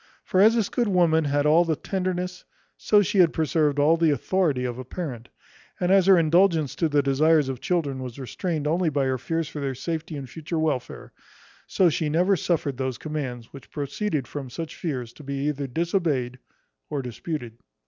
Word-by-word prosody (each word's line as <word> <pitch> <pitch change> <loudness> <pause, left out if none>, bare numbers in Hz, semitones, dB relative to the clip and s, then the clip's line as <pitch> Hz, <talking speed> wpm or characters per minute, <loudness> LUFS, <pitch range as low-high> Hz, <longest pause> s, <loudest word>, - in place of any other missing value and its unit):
For 185 - +2
as 220 +3 +6
this 220 -4 +1
good 240 -2 0
woman 170 -5 +3
had 145 0 +1
all 160 +3 +5
the 165 -2 0
tenderness, 180 +1 -3 0.3
so 205 -1 +3
she 205 0 0
had 170 -3 +5
preserved 155 -2 +1
all 150 +3 +4
the 165 -1 +3
authority 145 -2 0
of 125 0 -4
a - - -5
parent; 130 -5 -6 0.5
and 180 0 +1
as 195 -1 +5
her 190 -2 +7
indulgence 165 -2 +3
to 165 - +1
the 145 -1 +2
desires 150 +1 +3
of 130 - -3
her - - -26
children 155 -8 -1
was 125 -1 -7
restrained 150 - -3
only 165 +3 +1
by 140 -2 0
her 130 -1 -1
fears 165 +4 -2
for 150 - -7
their 135 -2 -2
safety 160 +3 -4
and 135 -2 -7
future 160 +4 -5
welfare, 155 -5 -2 0.5
so 185 - +3
she 155 -1 0
never 180 +6 +3
suffered 150 -6 -1
those 130 -2 -2
commands 130 -7 -5
which 140 - -12
proceeded 145 - -3
from 140 -3 -6
such 165 +5 -6
fears 125 -8 -4
to 150 - -14
be 140 0 -4
either 140 -2 -2
disobeyed 150 -5 -1 0.5
or 145 -3 -3
disputed. 120 -1 -6
155 Hz, 195 wpm, -25 LUFS, 135-175 Hz, 0.5 s, her